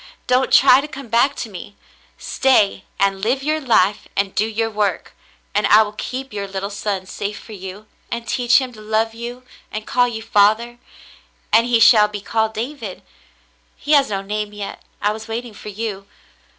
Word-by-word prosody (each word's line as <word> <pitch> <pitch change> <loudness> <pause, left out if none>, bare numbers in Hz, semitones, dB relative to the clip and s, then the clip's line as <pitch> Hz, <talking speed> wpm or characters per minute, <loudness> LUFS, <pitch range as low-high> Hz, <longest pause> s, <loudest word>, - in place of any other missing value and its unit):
Don't 255 +1 +2
try 265 0 +7
to 295 - -6
come 275 -4 -9
back 240 +5 +3
to - - -5
me. 200 +2 -9 0.4
Stay 215 -8 +2
on 200 - +5
and 195 -1 -6
live 250 +6 0
your 310 +2 0
life 210 -6 +2
and 195 -1 0
do 215 - +1
your 225 +1 -1
work, 210 -2 -1 0.4
and 205 0 +2
I 215 +2 +7
will 210 - -6
keep 255 +3 -6
your 200 -1 -4
little 195 +1 -4
son 200 -2 -3
safe 200 +2 -5
for - - -13
you, 190 +1 -8 0.2
and 235 -1 -5
teach 245 -1 +3
him 255 -2 -5
to 215 - -12
love 220 +1 0
you 240 +2 -7 0.3
and 215 0 -5
call 245 -1 +2
you 220 -2 -5
father, 225 +3 +2 0.7
and 230 +2 +5
he 240 -2 +3
shall 220 -2 +7
be 210 0 -6
called 220 +2 -1
David. 230 -4 -5 0.7
He 295 - -5
has 285 -4 +5
no 195 -1 -2
name 210 +1 -4
yet; 205 -1 -7 0.2
I 205 - +3
was 220 +1 -7
waiting 230 +1 -5
for 210 - -9
you. 205 -2 -5
220 Hz, 190 wpm, -20 LUFS, 205-240 Hz, 0.7 s, try